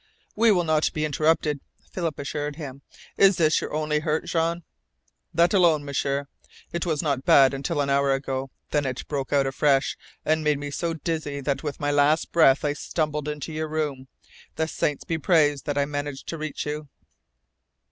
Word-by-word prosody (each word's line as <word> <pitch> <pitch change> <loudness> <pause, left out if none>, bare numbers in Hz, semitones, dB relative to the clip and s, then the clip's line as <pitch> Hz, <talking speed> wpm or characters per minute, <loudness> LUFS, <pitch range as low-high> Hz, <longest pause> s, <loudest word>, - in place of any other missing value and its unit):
"We 225 +1 +5
will 180 -4 +3
not 155 -1 +2
be 155 0 -1
interrupted," 155 0 +1 0.3
Philip 165 -5 -3
assured 145 +1 -4
him. 140 -3 -8 0.4
"Is 195 -2 +5
this 155 -2 +3
your - - -5
only 150 0 0
hurt, 155 0 -1
Jean?" 170 +1 0 0.7
"That 170 +3 +3
alone, 165 -6 +4
M'sieur. 140 0 -1 0.5
It 170 +1 -2
was 160 0 0
not 140 -4 0
bad 135 -1 +6
until 145 +3 -1
an 140 -1 0
hour 140 0 +3
ago. 135 0 -2 0.2
Then 145 -2 +1
it 130 -1 -5
broke 140 -3 -3
out 140 -1 +3
afresh, 135 0 +2 0.3
and 155 0 +1
made 150 -1 +2
me 145 0 -5
so 165 +3 -2
dizzy 155 -3 -3
that 135 0 -1
with 145 -3 -5
my 145 0 0
last 145 +2 +2
breath 150 -3 +5
I 145 - +1
stumbled 150 -1 -2
into 150 +1 -4
your 155 0 -2
room. 150 -4 -3 0.5
The 160 0 0
saints 150 -2 -1
be 165 -1 -2
praised 150 -5 +2
that 145 -1 -1
I 140 - +3
managed 145 -1 -5
to 165 - -4
reach 155 -1 -4
you!" 150 0 -5
150 Hz, 185 wpm, -25 LUFS, 140-160 Hz, 0.7 s, bad